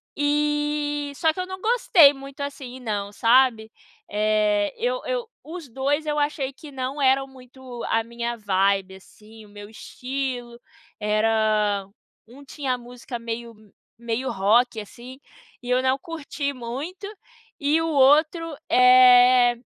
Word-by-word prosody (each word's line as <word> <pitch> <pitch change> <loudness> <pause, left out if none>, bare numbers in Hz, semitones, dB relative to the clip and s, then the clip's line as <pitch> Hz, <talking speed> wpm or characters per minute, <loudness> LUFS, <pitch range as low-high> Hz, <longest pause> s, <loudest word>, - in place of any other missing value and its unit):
E, 295 0 -1
só 320 +1 +1
que 365 - -8
eu 365 - -3
não 375 0 -7
gostei 385 - +5
muito 275 +1 -11
assim 265 -3 -7
não, 205 -4 -4
sabe? 230 -1 +3 0.4
É, 210 -1 +1
eu - - -1
eu - - -2 0.2
os 325 -2 -9
dois 280 +5 -1
eu 300 0 -1
achei 285 -2 -2
que 290 +2 -13
não 265 +2 -4
eram 270 0 +3
muito 255 -2 -12
a 225 0 +1
minha 235 0 -5
vibe 195 -1 0
assim, 215 +3 -16
o - - -18
meu 205 0 -11
estilo. 250 0 -6 0.4
Era 215 -2 +1 0.4
um 270 +4 -15
tinha 270 -2 -3
a - - -2
música 245 0 -9
meio 230 0 -6 0.4
meio 235 +2 -3
rock 220 +4 +2
assim 245 +5 -11 0.4
e 245 - -8
eu 255 +1 +3
não 260 +1 +1
curti 285 -2 -5
muito 275 - -7 0.5
e 300 +3 +1
o 325 - -1
outro, 310 +3 +3
eh, 250 -1 +6
255 Hz, 140 wpm, -23 LUFS, 225-290 Hz, 0.5 s, eh